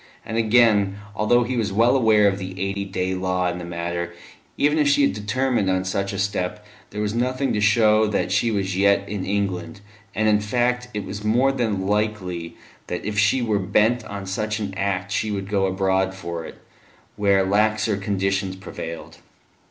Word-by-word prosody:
And, 110 - -5
again, 110 -3 +3 0.2
although 120 +3 +3
he 125 +2 -3
was 110 -4 -1
well 115 +6 +3
aware 110 -5 +4
of 100 0 0
the 95 0 -7
eight 100 0 -3
day 95 0 -1
law 90 -1 0
in 90 - -6
the - - -6
matter, 85 0 -4 0.4
even 150 +2 +2
if 150 - +3
she 145 0 +4
had 140 - +3
determined 105 +1 0
on 95 0 0
such 100 +1 -2
a 100 - -5
step 100 +1 -2 0.2
there 105 - -5
was 105 0 -1
nothing 130 +3 0
to 105 - 0
show 110 0 +4
that 105 - -1
she 105 +5 +2
was 100 -3 -1
yet 100 +1 +3
in 100 -2 -4
England, 100 -2 -2 0.3
and, 110 +3 +1
in 105 -1 +4
fact, 125 +3 0
it 105 - -3
was 105 +1 -6
more 120 +6 +3
than 110 -8 -1
likely 100 -5 -2 0.3
that - - -4
if 105 -1 -1
she 105 +5 +3
were 110 -3 +1
bent 110 +5 +2
on 100 -1 -6
such 105 +3 -2
an 100 -2 -4
act 100 0 -2
she 110 +2 -1
would 100 -2 -3
go 100 -1 +1
abroad 95 0 0
for 85 -3 -6
it, - - -11 0.6
where 100 -2 +3
laxer 110 +2 +2
conditions 95 -1 -1
prevailed. 85 -3 -8
100 Hz, 190 wpm, -23 LUFS, 95-110 Hz, 0.6 s, aware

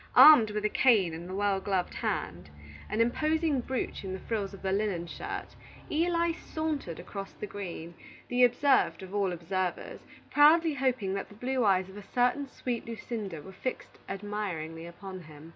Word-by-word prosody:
Armed 270 -9 +10
with 210 0 -2
a - - +3
cane 210 -9 +4
in 170 +2 -7
the 185 - -5
well 200 -1 +1
gloved 190 -2 -1
hand, 95 - -3 0.4
an 220 - +1
imposing 305 +4 +1
brooch 260 -3 -3
in 190 -1 -4
the 190 - -5
frills 210 -4 -2
of 195 -1 -12
the 190 - 0
linen 195 -4 0
shirt, 170 - -6 0.4
Eli 335 +1 +2
sauntered 315 - -4
across 195 +2 -7
the - - -6
green, 180 -4 -7 0.3
the 250 0 +3
observed 260 -3 +3
of 190 +1 -9
all 200 -2 +1
observers, 180 +1 -3 0.3
proudly 315 +2 +6
hoping 255 -8 0
that 195 - -4
the 205 - -14
blue 250 +3 -1
eyes 190 -3 +3
of 190 +1 -12
a 205 - -10
certain 250 +3 +2
sweet 245 -3 -4
Lucinda 215 - -5
were 190 - -10
fixed 255 +7 -5
admiringly 185 -5 -4
upon 185 +2 -9
him. 155 -1 -13
205 Hz, 175 wpm, -30 LUFS, 185-255 Hz, 0.4 s, Armed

